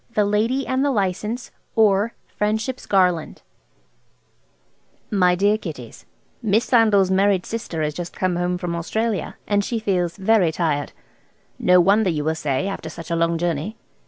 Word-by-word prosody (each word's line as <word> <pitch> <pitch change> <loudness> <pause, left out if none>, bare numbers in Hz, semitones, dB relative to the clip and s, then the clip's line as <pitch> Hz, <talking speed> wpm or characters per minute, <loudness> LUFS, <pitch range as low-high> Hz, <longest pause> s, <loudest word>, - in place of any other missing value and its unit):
THE 210 - +3
LADY 225 +6 +1
AND 260 +1 0
THE 285 - +2
LICENSE; 210 +1 -2 0.2
OR, 215 0 +3
FRIENDSHIP'S 220 +5 -2
GARLAND 180 -5 +1 1.7
"MY 180 -3 +3
DEAR 205 +3 +2
KIDDIES,–Miss 195 - -4
Sandal's 210 -6 +4
married 195 -1 +2
sister 175 -8 -4
has 150 0 -1
just 175 +2 -7
come 185 -1 0
home 175 +1 -1
from 175 -2 -3
Australia, 220 +5 -2
and 205 -1 +1
she 235 - -2
feels 185 -5 -1
very 195 -4 +3
tired. 155 -4 -1 0.7
No 180 0 +5
wonder 200 +3 +4
you 150 -3 -1
will 160 +1 +1
say, 150 +2 -1
after 195 -5 -5
such 165 +1 -9
a - - +1
long 165 0 +1
journey. 175 +5 -2
190 Hz, 150 wpm, -22 LUFS, 170-215 Hz, 1.7 s, No